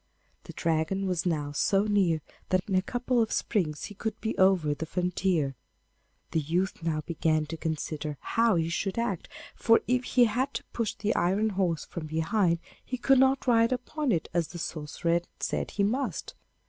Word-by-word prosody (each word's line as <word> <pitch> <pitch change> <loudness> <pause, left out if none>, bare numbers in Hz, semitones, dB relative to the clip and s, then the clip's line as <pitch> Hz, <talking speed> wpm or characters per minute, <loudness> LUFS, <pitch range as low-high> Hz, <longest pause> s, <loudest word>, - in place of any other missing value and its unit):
The - - -9
Dragon 165 +4 0
was 180 -2 0
now 150 -4 -1
so 195 +7 +2
near 195 -7 +2 0.3
that 185 0 +1
in 195 - -2
a 185 - +4
couple 245 +4 0
of 220 - 0
springs 160 -9 0
he 205 - -7
would 220 -1 -2
be 220 - -2
over 185 -6 +4
the 160 +2 -5
frontier. 180 -5 0 0.8
The 165 - +2
youth 170 +5 -1
now 160 -2 -1
began 155 -1 0
to 165 - -5
consider 155 -2 -3
how 230 -3 +2
he 165 -1 +1
should 190 +4 -2
act, 230 -7 -2 0.2
for 230 0 +4
if 250 0 +2
he 245 -1 +4
had 255 +5 -1
to - - -3
push 230 -3 -1
the 210 +1 0
iron 195 +5 +2
horse 185 -5 0
from 165 -3 -6
behind 165 +3 +1 0.3
he 255 - -4
could 270 +1 +4
not 265 0 +3
ride 230 -1 +4
upon 255 +3 -1
it 165 -6 0
as 170 -2 +1
the - - -9
sorcerer 160 0 -3
had 170 0 0
said - - -2
he 200 - -1
must. 250 +7 -1
185 Hz, 185 wpm, -28 LUFS, 160-225 Hz, 0.8 s, a